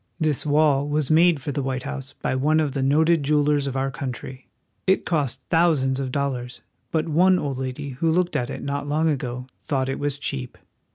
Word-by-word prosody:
This 155 -2 +1
wall 145 -1 +3
was 150 -1 0
made 165 0 +5
for 145 - -2
the 140 - -2
White 130 -1 -2
House 140 -1 -6
by - - 0
one 150 +4 +2
of 150 -3 +1
the 135 0 -2
noted 155 +4 +3
jewel 150 +1 +2
ers 145 -1 +1
of 135 -1 -3
our 135 0 0
country. 130 0 -6 0.4
It 190 - +3
cost 140 -6 -1
thousands 150 -6 +3
of 130 -2 -3
dollars, 130 -3 -3 0.3
but 160 0 0
one 180 +4 +4
old 140 -6 -3
lady 130 +2 -4
who 135 +5 -1
looked 180 +2 +1
at 120 - -1
it - - -6
not 140 +1 -3
long 155 +2 +2
ago 130 -4 -2 0.2
thought 135 -3 -1
it 135 - -3
was 145 -1 -1
cheap. 135 -3 -4
145 Hz, 210 wpm, -24 LUFS, 135-155 Hz, 0.4 s, made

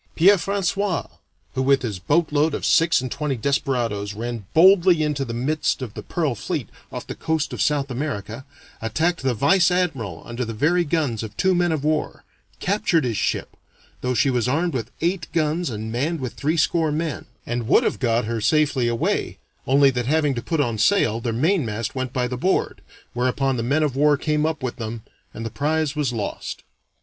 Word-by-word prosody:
Pierre 195 +5 +6
François, 195 0 -1 0.4
who, 130 - -1
with 135 0 +3
his 105 -6 -3
boatload 150 - +1
of - - -4
six 165 -4 +4
and 130 -2 -5
twenty 150 -3 -2
desperadoes, 115 -6 -1
ran 115 -2 -5
boldly 175 -1 +6
into 150 -2 -1
the 120 - -5
midst 130 +3 -1
of 115 -4 -7
the - - -6
pearl 155 -7 -1
fleet 115 - -4 0.2
off - - -6
the - - -6
coast 160 -2 -2
of - - -3
South 140 -2 +1
America, 125 -3 -4 0.4
attacked 160 +11 0
the 130 -2 0
vice 175 - +4
admiral 135 - -1
under 120 +1 -4
the 115 -2 -5
very 175 +9 +2
guns 145 -8 -1
of 110 -2 -8
two 190 0 +3
men 175 -1 +2
of 155 -3 -1
war, 155 0 -1 0.4
captured 180 -5 +1
his 120 -3 -1
ship, - - -2 0.5
though 125 0 -1
she 135 - +3
was 125 -2 0
armed 165 +6 0
with 120 -3 -3
eight 170 0 0
guns 165 +1 0
and 110 -1 -5
manned 150 +8 -1
with 130 -3 -4
threescore 160 +1 +1
men, 155 -2 -3 0.2
and 120 -1 -3
would - - +5
have - - -1
got 115 -2 +1
her 115 0 -2
safely 140 +1 +2
away, 115 -1 -1 0.3
only 135 +1 +5
that 125 -1 -2
having 150 -1 +2
to 120 - -3
put 160 +6 -2
on 120 -6 0
sail, 115 - +3
their 115 - -1
main 155 - +2
mast 110 -1 -3
went 130 -1 -3
by 125 -2 0
the 125 - -4
board, 185 +10 0 0.3
whereupon 130 +2 0
the 120 - -2
men 140 +7 +1
of 145 -4 -1
war 145 +1 +4
came 150 +1 0
up 155 -3 -3
with 125 - -3
them, 115 -1 -5 0.3
and 115 - -7
the 115 - -4
prize 150 +2 0
was 145 -4 0
lost. 110 -4 -5
140 Hz, 200 wpm, -23 LUFS, 120-160 Hz, 0.5 s, Pierre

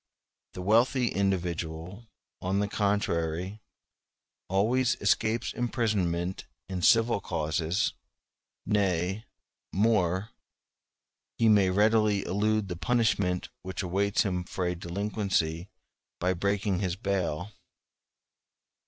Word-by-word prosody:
The 90 - -5
wealthy 120 +4 +3
individual, 90 +1 -2 0.3
on 95 +2 0
the 100 0 +1
contrary, 95 -2 -1 0.9
always 115 +7 +2
escapes 115 +1 +1
imprisonment 95 -7 -1 0.2
in 95 -1 -4
civil 115 +3 +4
causes; 80 +2 -1 0.7
nay, 95 0 0 0.5
more, 100 -1 +1 1.1
he 115 - +3
may 100 -3 +5
readily 105 +1 +3
elude 105 +1 +1
the 90 - -4
punishment 100 -5 +1
which 95 -1 -5
awaits 100 +3 +1
him 90 -4 -1
for 90 0 -3
a 90 - 0
delinquency 90 -1 -2 0.5
by 90 +1 +1
breaking 100 +1 0
his 95 -3 -1
bail. 95 -2 -2
95 Hz, 95 wpm, -28 LUFS, 90-105 Hz, 1.1 s, may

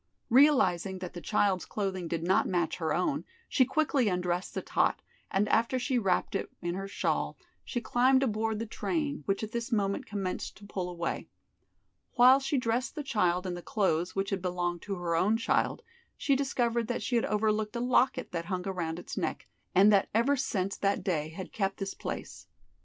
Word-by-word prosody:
Realizing 250 - +4
that 180 -1 -7
the 175 - -7
child's 195 -2 +1
clothing 190 -4 -3
did 165 -1 -2
not 185 +2 +3
match 175 -3 0
her 160 -3 -1
own, 230 - 0 0.2
she 260 - +3
quickly 270 -2 +1
undressed 180 -1 -1
the - - -1
tot, - - +1 0.3
and 200 +2 +1
after 230 +3 +2
she 255 +2 -2
had 240 -5 +1
wrapped 185 - +1
it 195 - -2
in 175 0 -2
her 195 +2 -4
shawl 195 - -1 0.3
she 245 - -3
climbed 255 +4 +3
aboard 220 -2 0
the 225 - -3
train, 290 +5 -2
which 195 +2 0
at 215 - -4
this 235 +1 -3
moment 200 -3 0
commenced 195 -3 -4
to 205 - -13
pull 185 -3 -4
away. 170 -1 -4 0.8
While 255 +2 +7
she 275 +1 -1
dressed 245 +1 -1
the 300 - -4
child 180 -9 +1
in 180 - -2
the 175 - -6
clothes 180 -4 0
which 195 +1 -1
had 195 -2 -1
belonged 175 -1 -2
to 200 -1 -2
her 175 -2 -1
own 205 +7 +3
child, 230 - 0 0.3
she 280 - +2
discovered 240 -4 0
that 245 - -2
she 245 - -1
had 235 - +2
overlooked 215 0 0
a - - -1
locket 255 +2 +2
that 170 -1 -3
hung 185 +1 -3
around 170 -4 -2
its 175 - -7
neck, - - -3 0.3
and 200 +3 +7
that 200 0 +3
ever 245 +6 +4
since 200 -8 -1
that 200 0 0
day 155 -5 -1
had 180 +4 -8
kept 195 -2 -1
this 195 -1 -4
place. - - -6
200 Hz, 195 wpm, -30 LUFS, 180-240 Hz, 0.8 s, While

